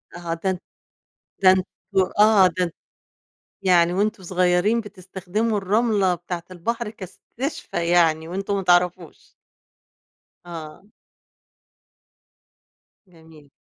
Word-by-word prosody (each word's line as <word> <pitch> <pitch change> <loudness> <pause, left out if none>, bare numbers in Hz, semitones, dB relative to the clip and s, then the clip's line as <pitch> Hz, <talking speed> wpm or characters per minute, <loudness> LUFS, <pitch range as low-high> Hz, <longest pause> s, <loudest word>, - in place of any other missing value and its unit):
آه، 175 -1 -4
ده 170 +3 -2
أن 185 - -2 0.8
ده 190 - +7
أنتم 190 0 0
آه 210 -3 +6
ده 180 +1 0
أنت 170 - -6 0.9
يعني 175 -2 +4
وأنتم 205 +1 -1
صغيّرين 180 +5 +2
بتستخدموا 205 +2 -3
الرملة 200 -1 +1
بتاعة 175 0 -6
البحر 230 +6 -3
كإستشفاء 215 - -6
يعني 165 -2 +3
وأنتم 195 +3 -3
ما 195 - -1
تعرَفوش. 175 -1 0 1.1
آه. 165 +1 -9 2.2
جميل. 160 -4 -18
185 Hz, 95 wpm, -23 LUFS, 175-200 Hz, 2.2 s, ده